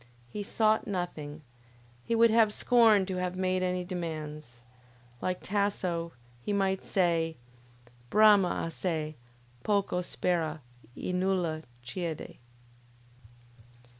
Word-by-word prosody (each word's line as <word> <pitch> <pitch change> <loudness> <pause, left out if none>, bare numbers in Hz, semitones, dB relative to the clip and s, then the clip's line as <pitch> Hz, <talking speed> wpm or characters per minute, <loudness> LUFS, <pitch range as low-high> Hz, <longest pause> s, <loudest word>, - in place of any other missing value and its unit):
He 210 - -5
sought 215 +1 +1
nothing; 155 -6 -4 0.6
he 230 - 0
would 230 0 +6
have 225 -1 +5
scorned 220 -4 +4
to 190 -1 -3
have 180 0 -2
made 185 0 +1
any 180 0 0
demands. 155 -8 -6 0.6
Like 185 0 -2
Tasso, 185 -4 -1 0.3
he 205 - -3
might 195 -1 +1
say: 165 -3 +1 0.7
Brama 210 -3 +5
assai, 160 -2 -2 0.5
poco 200 -2 +1
spera, 165 -3 -1 0.4
e 180 - -3
nulla 180 -4 0 0.2
chiede. 165 +4 -5
180 Hz, 105 wpm, -30 LUFS, 165-200 Hz, 0.7 s, would